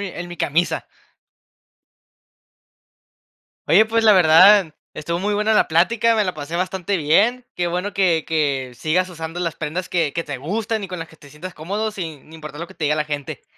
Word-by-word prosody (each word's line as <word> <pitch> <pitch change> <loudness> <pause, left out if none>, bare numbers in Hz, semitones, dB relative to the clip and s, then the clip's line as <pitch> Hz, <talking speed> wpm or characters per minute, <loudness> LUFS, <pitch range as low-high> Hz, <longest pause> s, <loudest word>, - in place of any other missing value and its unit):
mi 200 - -4
en 175 - -10
mi 175 - -9
camisa". 165 +4 0 2.8
Oye, 220 - +6
pues, 225 +1 0
la 215 - +7
verdad, 180 0 +6 0.2
estuvo 170 +3 -3
muy 205 +2 -1
buena 210 +1 +1
la 215 - +3
plática, 230 +8 +2
me 215 - +2
la 185 -4 -2
pasé 150 +2 -7
bastante 185 +2 -2
bien, 205 +11 +2
qué 175 - 0
bueno 180 +4 -3
que 175 -5 +1
que 140 -5 -1
sigas 180 +6 0
usando 165 0 -7
las 170 -2 -3
prendas 165 +4 -4
que 165 -5 0
que 170 - -2
te 145 -3 -6
gustan 210 - -3
y - - -8
con 180 -1 -6
las 165 - -7
que 160 - -18
te 145 -2 -17
sientas 175 +6 -9
cómodo, 200 +8 -3
sin 160 -6 -8
importar 150 -1 -9
lo 170 - -6
que 190 - -15
te 155 - -4
diga 150 +1 +2
la 155 0 -1
gente. 145 -2 -6
175 Hz, 200 wpm, -20 LUFS, 155-200 Hz, 2.8 s, la